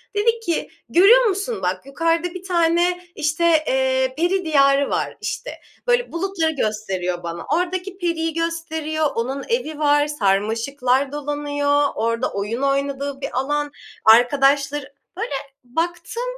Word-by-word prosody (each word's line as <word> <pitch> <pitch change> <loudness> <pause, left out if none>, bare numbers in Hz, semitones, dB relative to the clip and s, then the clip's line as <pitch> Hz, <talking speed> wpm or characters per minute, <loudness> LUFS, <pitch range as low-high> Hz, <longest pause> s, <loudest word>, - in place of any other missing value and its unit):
dedi 455 +3 +2
ki, 345 -8 -2 0.2
"Görüyor 450 +8 +6
musun, 415 +2 -1
bak, 185 +6 -2
yukarıda 330 +5 0
bir 365 -1 -8
tane, 350 0 +2
işte, 310 +2 -1 0.2
eee, 260 0 +1
peri 360 +3 +1
diyarı 280 -2 +4
var." - - -1
işte. - - -4 0.4
Böyle, 485 0 +2
bulutları 340 -2 -1
gösteriyor 195 - -2
bana. 170 0 -5
Oradaki 365 +2 -2
periyi 330 -3 -1
gösteriyor, 320 -2 -1
onun 265 +4 -2
evi 315 -11 -1
var, 290 -1 +3
sarmaşıklar 250 +3 0
dolanıyor, 290 0 0
orada 230 +3 -1
oyun 210 +6 -3
oynadığı 275 0 -1
bir 275 - -3
alan, 290 +2 -1 0.3
arkadaşları 275 +4 +4 0.2
Böyle - - -3 0.3
baktım, 345 - -3
290 Hz, 125 wpm, -21 LUFS, 265-340 Hz, 0.4 s, Görüyor